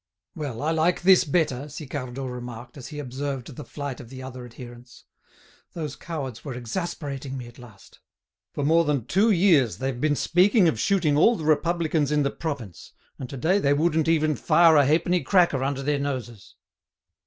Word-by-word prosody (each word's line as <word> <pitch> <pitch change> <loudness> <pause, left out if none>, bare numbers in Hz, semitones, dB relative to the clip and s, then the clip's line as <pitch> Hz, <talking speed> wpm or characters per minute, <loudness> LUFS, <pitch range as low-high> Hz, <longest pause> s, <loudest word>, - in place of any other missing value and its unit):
"Well, 145 - -5
I 155 - +1
like 165 +3 +1
this 185 0 +6
better," 145 -3 0
Sicardot 135 -3 -6
remarked, 120 -1 -8
as 135 -4 -9
he 150 - -9
observed 135 -2 -5
the 150 - -7
flight 140 -3 -6
of 120 -5 -11
the 130 0 -9
other 130 -1 -8
adherents. 120 0 -12 0.7
"Those 155 -5 -5
cowards 140 -8 -6
were 135 -4 -6
exasperating 135 +1 -5
me 125 - -7
at 120 +2 -14
last. 110 -6 -16 0.6
For 145 - -1
more 165 +3 +4
than 145 -7 -1
two 205 +5 +2
years 170 - +3
they've 130 -2 -3
been 150 -1 +2
speaking 185 - +3
of 120 -9 0
shooting 165 - +2
all 230 +10 +5
the 160 - -6
Republicans 155 -1 +1
in 150 -1 +2
the 140 - 0
province, 135 - -6 0.3
and 130 - -6
to 135 - -7
day 180 +10 +2
they 140 -6 +2
wouldn't 160 +1 +1
even 155 -2 +2
fire 165 +5 +4
a 145 -2 +5
halfpenny 170 +4 +2
cracker 170 -8 +2
under 135 0 -2
their 145 0 0
noses." 125 -7 -5
145 Hz, 180 wpm, -25 LUFS, 130-160 Hz, 0.7 s, this